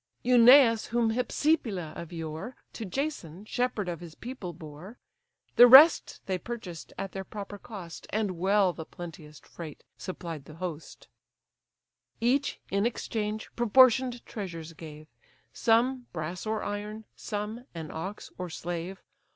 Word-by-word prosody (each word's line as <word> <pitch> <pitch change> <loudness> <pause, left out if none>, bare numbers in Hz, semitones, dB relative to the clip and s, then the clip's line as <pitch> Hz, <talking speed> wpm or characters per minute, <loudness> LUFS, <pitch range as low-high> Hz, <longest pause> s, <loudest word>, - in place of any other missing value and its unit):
(Eunaeus, 245 -1 +7
whom 235 -1 +1
Hypsipyle 225 - 0
of 170 - -8
yore 165 +8 -6 0.2
To 225 - -6
Jason, 205 - -4
shepherd 245 -4 -1
of 170 -2 -3
his 170 -2 -10
people, 235 -7 -7
bore,) 160 +7 -11 0.6
The 245 - +11
rest 285 +7 +8
they 185 -1 -1
purchased 185 -7 -7
at 195 - -4
their 195 - -5
proper 205 +1 -8
cost, 190 -8 -9
And 205 -5 -1
well 195 0 +3
the 160 - -7
plenteous 155 -3 -10
freight 160 -4 -10 0.2
supplied 165 -6 -6
the 155 - -12
host: 165 -2 -7 1.1
Each, 265 +5 +1
in 200 +3 +2
exchange, 215 -2 -3
proportion'd 245 +1 +4
treasures 170 -6 -6
gave; 155 -1 -10 0.5
Some, 245 +2 +2
brass 175 +5 -4
or 220 0 -1
iron; 210 +1 -5
some, 215 +3 -5
an 160 -2 -6
ox, 190 +6 -6
or 180 -1 -4
slave. 175 +3 -5
200 Hz, 135 wpm, -29 LUFS, 170-235 Hz, 1.1 s, The